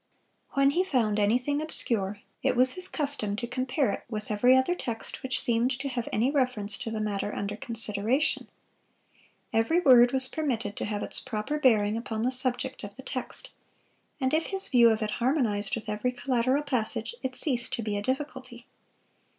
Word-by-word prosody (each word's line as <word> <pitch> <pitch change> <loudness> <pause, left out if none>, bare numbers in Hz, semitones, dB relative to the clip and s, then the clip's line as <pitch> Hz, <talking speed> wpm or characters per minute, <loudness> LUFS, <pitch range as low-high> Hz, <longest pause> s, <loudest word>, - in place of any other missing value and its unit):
When 275 0 +4
he 355 +5 +2
found 230 - 0
anything 250 +8 +1
obscure, 210 -9 +1 0.2
it - - +1
was 255 +1 +6
his 365 0 -2
custom 285 - -1
to 240 - -3
compare 255 0 -1
it - - -5
with 215 -2 -5
every 245 +5 +5
other 260 +7 +2
text 235 -10 -5
which 260 -1 -2
seemed 235 +1 +2
to 275 0 -3
have 240 -2 -3
any 240 +6 +1
reference 250 -8 0
to - - -4
the 220 -1 -3
matter 210 -1 -2
under 200 +1 -3
consideration. 225 +4 0 1.1
Every 225 +10 +2
word 245 -6 +6
was 265 -1 +2
permitted 240 -10 -2
to - - -2
have 210 -1 -3
its - - +3
proper 240 +7 -3
bearing 220 -5 +3
upon 225 -1 -4
the 250 - +1
subject 260 +1 -2
of 200 0 -8
the 265 - -11
text, 260 -2 -6 0.7
and 260 0 0
if 320 +1 +1
his 385 -1 0
view 240 -3 +6
of 220 0 0
it 210 - -2
harmonized 230 -6 +2
with 230 -1 -7
every 210 +4 -1
collateral 255 +2 0
passage, 255 - -1
it 260 -1 -4
ceased 250 -5 -1
to 230 - -2
be 210 -1 -2
a 205 - -2
difficulty. 260 -1 -4
245 Hz, 185 wpm, -27 LUFS, 215-265 Hz, 1.1 s, was